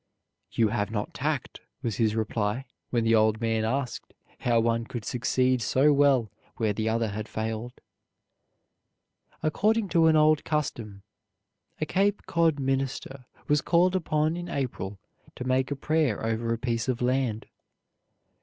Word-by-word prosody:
"You 115 -2 +3
have 105 -1 -1
not 105 -2 -3
tact," 145 -1 -3 0.2
was 115 -5 -2
his 110 -2 +2
reply, 110 +2 -1 0.2
when 120 -2 +1
the 115 0 +3
old 110 -1 +3
man 115 -1 0
asked 125 +3 -3 0.2
how 120 -2 +2
one 115 0 +1
could 120 -2 -6
succeed 125 +1 +1
so 135 +6 +3
well 140 -6 +3 0.3
where 110 -3 +1
the 110 +2 -1
other 115 0 0
had 105 +2 -5
failed. 110 +2 -4 1.7
According 210 +6 +1
to 165 -2 +4
an 160 - +5
old 155 0 +4
custom 115 -10 -3 0.8
a 155 - 0
Cape 200 +5 +1
Cod 165 -3 +2
minister 135 -1 -2 0.2
was 150 -1 +3
called 180 +2 +3
upon 155 -3 +1
in 175 0 -6
April 105 -7 -3 0.4
to - - -5
make 130 +1 +1
a 145 - -2
prayer 145 -6 0
over 115 +1 -1
a 115 - 0
piece 115 0 -2
of 125 -1 -1
land. 125 -3 0
125 Hz, 150 wpm, -27 LUFS, 110-150 Hz, 1.7 s, an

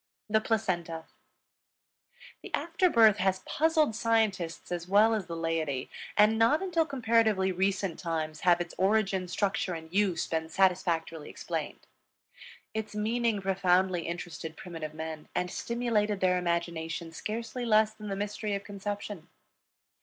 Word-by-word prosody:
THE 220 +1 +2
PLACENTA. 175 -8 -1 1.4
The - - -10
after 340 +2 +1
birth 220 - +6
has 190 0 +1
puzzled 310 -6 +2
scientists 215 -9 0
as 175 -1 -3
well 210 +4 +5
as 210 -5 -2
the 170 - -5
laity, 160 -5 -2 0.3
and 215 +2 +5
not 285 +10 +4
until 335 -4 +1
comparatively 225 -7 +2
recent 190 -1 0
times 155 -3 -3
have 175 -1 +4
its 175 -1 -4
origin, 195 -1 +2
structure, 195 0 -1
and 160 +1 -9
use 195 -3 +2
been 160 0 -2
satisfactorily 165 -4 +1
explained. - - -5 0.9
Its 220 -1 -4
meaning 220 -1 0
profoundly 185 -2 +2
interested 170 -2 -6
primitive 165 -6 -7
men 160 -1 -6
and 180 0 -1
stimulated 225 -4 0
their 180 -1 +3
imagination 170 -1 -2
scarcely 230 +7 -4
less 215 -2 +4
than 215 -1 -9
the 195 - -2
mystery 205 +1 -2
of 200 - -4
conception. 205 -3 -6
195 Hz, 135 wpm, -29 LUFS, 170-220 Hz, 1.4 s, birth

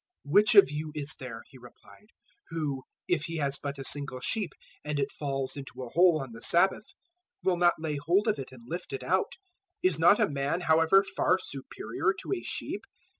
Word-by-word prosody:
012:011 145 - -7
"Which 210 +2 +6
of 200 -8 +8
you 150 +1 -4
is 150 0 -2
there," 115 -3 -7
He 135 - -15
replied, 125 +11 -17 0.4
"who, 150 -5 -3 0.3
if 165 -3 +1
he 165 0 -4
has 140 -2 0
but 140 -1 -5
a 135 - -6
single 140 -3 -1
sheep 200 - -1 0.3
and 150 -1 -2
it 140 0 -1
falls 135 -2 -3
into 135 -2 -8
a 125 - -7
hole 175 -2 +5
on 130 - -10
the 115 0 -11
Sabbath, 190 - +3 0.6
will 185 - +2
not 175 0 +4
lay 155 -2 -3
hold 175 +9 +1
of 215 - +1
it 130 - -7
and 125 -2 -13
lift 170 +2 -6
it 130 -1 -4
out? 185 +8 +1 0.5
012:012 - - +7
Is 160 -4 -2
not 175 +5 +6
a - - +4
man, 145 +4 -1
however, 165 +3 +5
far 185 - +3
superior 140 - -3
to - - -3
a 365 - -2
sheep? - - -5
150 Hz, 210 wpm, -29 LUFS, 135-180 Hz, 0.6 s, of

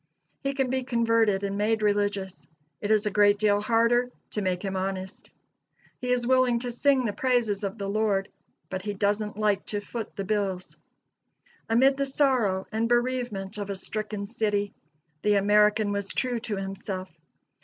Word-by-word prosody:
He 275 0 -2
can 265 -2 0
be 260 0 0
converted 230 -5 +2
and 200 0 -2
made 215 +1 +1
religious; 205 -2 -1 0.3
it 205 - -2
is 215 0 +3
a 210 - 0
great 205 0 +4
deal 205 -1 +2
harder 235 +3 +3 0.2
to 210 - -2
make 185 0 -1
him 195 -1 -2
honest. 190 0 -4 0.7
He 250 - -4
is 245 -1 +1
willing 255 -1 +3
to 245 -1 -3
sing 260 +1 +2
the 210 - -1
praises 235 -5 +1
of 200 +2 -3
the 200 - -4
Lord, 200 -1 +1 0.4
but 185 0 -4
he 205 +1 -4
doesn't 210 +1 0
like 210 -2 +1
to 205 - -2
foot 220 +2 -6
the 195 - -3
bills. 195 -2 -2 0.9
Amid 265 +4 +4
the 275 0 0
sorrow 250 -9 +1
and 225 +1 0
bereavement 240 -5 -1
of 205 -1 -4
a 200 - -2
stricken 210 +1 -4
city, 205 -2 -1 0.5
the 210 0 +3
American 210 +1 +4
was 200 -1 -2
true 250 -2 -1
to 225 -2 -4
himself. 195 -1 -5
210 Hz, 170 wpm, -27 LUFS, 200-235 Hz, 0.9 s, great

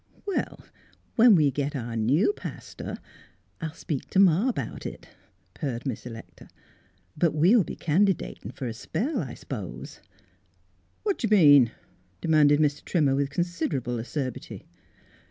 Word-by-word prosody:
" - - -29
Well, 400 -3 -3 0.5
when 230 -3 +7
we 150 -4 +4
get 145 +2 -2
our 120 -3 -4
new 135 - +2
pastor, - - -7 0.6
I'll 160 -1 -5
speak 150 -7 -5
t' - - -2
ma 195 +5 +5
about 245 - -4
it," - - -8 0.4
purred 130 -5 -4
Miss 125 -2 -4
Electa. 115 -1 -11 0.3
" 90 0 -38
But 170 -3 +1
we'll 185 +8 +5
be - - -7
candidatin' 185 +3 0
fer 135 - -7
a 115 - -3
spell, 210 - -2
I - - -6
s'pose." - - -7 1.0
"What 405 -3 0
do 230 - 0
you 210 0 +5
mean?" 145 - +7 0.5
demanded 150 +1 +4
Mr. 150 -1 +1
Trimmer, 150 -6 +2
with 140 0 0
considerable 140 -7 -2
acerbity. 130 +2 -5
150 Hz, 145 wpm, -26 LUFS, 130-180 Hz, 1.0 s, when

